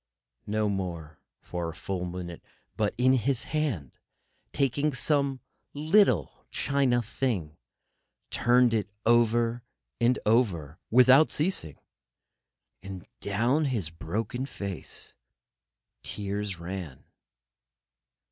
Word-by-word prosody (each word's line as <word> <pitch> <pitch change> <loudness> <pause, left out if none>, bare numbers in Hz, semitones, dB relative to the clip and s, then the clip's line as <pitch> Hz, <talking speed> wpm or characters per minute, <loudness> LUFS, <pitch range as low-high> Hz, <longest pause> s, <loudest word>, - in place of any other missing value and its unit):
No 105 +1 +1
more 85 -6 -4 0.2
for 85 -1 -3
a 80 - -8
full 90 +3 -3
minute; 90 -1 -6 0.3
but 105 -2 0
his 130 0 +3
hand, 135 - -2 0.5
taking 140 +1 +1
some 140 0 +1 0.3
little 150 - +3
china 130 -4 +1
thing, 100 - -2 0.8
turned 120 0 +4
it 105 -2 0 0.2
over 120 0 +3 0.4
and 120 +2 +3
over 95 - +1
without 130 +5 +7
ceasing, 150 - -1 1.0
and 95 -2 -8
down 120 +10 +1
his 110 - -1
broken 110 +10 -3
face 100 - -6 0.9
tears 100 -1 -3
ran. 85 -5 -6
110 Hz, 90 wpm, -28 LUFS, 90-130 Hz, 1.0 s, without